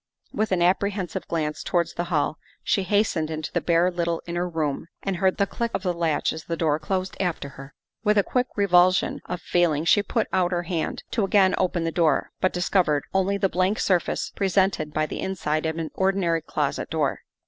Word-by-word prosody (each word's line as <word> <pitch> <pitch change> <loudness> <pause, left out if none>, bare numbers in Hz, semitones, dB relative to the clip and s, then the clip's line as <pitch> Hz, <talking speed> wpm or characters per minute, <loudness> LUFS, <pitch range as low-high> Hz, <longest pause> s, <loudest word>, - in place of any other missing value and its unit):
With 215 -1 -1
an 175 -2 +2
apprehensive 190 0 0
glance 155 -2 -2
towards 170 -2 0
the 175 - -2
hall 160 -2 0 0.2
she 195 - +1
hastened 190 -5 +1
into 155 -1 -4
the - - +1
bare 170 +1 +3
little 170 -1 -1
inner 175 +1 -2
room 160 -2 -2 0.2
and 195 -2 -1
heard 190 +1 +2
the 200 - +3
click 235 +4 -3
of - - -3
the 180 -2 0
latch 165 -3 0
as 160 - -8
the 165 - -3
door 155 -2 +1
closed 185 +4 -2
after 175 -6 -2
her. 135 +1 -12 0.3
With 210 -1 +3
a 200 - +5
quick 250 +4 0
revulsion 185 -2 +3
of 180 -1 -4
feeling 165 -3 +1
she 205 - +5
put 220 +2 -1
out 185 -1 +2
her 175 0 0
hand 170 -2 -3
to 225 - +1
again 195 -1 +4
open 180 -2 0
the 165 - -1
door, 165 -2 +1
but 185 - +3
discovered 175 -5 +1
only 190 +1 +1
the 195 - +2
blank 185 +3 +1
surface 180 -3 0
presented 190 -5 +1
by 155 +1 0
the - - -6
inside 160 -4 -1
of 160 0 -3
an 165 -1 -4
ordinary 190 -4 +1
closet 150 -2 -2
door. 155 -4 0
175 Hz, 205 wpm, -25 LUFS, 160-190 Hz, 0.3 s, a